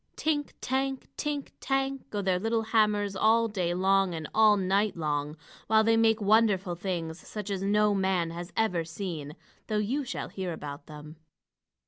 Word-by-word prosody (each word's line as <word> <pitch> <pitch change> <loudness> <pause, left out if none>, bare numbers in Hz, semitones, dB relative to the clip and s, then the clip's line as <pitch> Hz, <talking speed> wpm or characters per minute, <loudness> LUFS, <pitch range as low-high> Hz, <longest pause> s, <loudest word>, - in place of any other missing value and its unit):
Tink 295 -2 -1
tank! 265 +1 -1
tink 290 -2 -3
tank! 270 0 -1
go 205 -1 -3
their 185 -1 +1
little 225 +2 0
hammers 210 -3 +2
all 225 +3 +4
day 185 -5 -1
long 190 -1 +2
and 160 -1 -5
all 215 -1 +6
night 195 +1 +1
long, 150 -1 -2 0.3
while 220 0 +5
they 225 +1 +4
make 225 0 +3
wonderful 205 -3 +3
things 170 -2 -4
such 210 -1 -6
as 195 -1 -2
no 210 +1 +3
man 190 -4 0
has 175 +1 -7
ever 180 -7 +1
seen, 160 -3 -6 0.3
though 215 - 0
you 240 +8 0
shall 255 - -5
hear 185 -3 -4
about 145 -1 -8
them. 150 0 -11
200 Hz, 165 wpm, -28 LUFS, 175-225 Hz, 0.3 s, all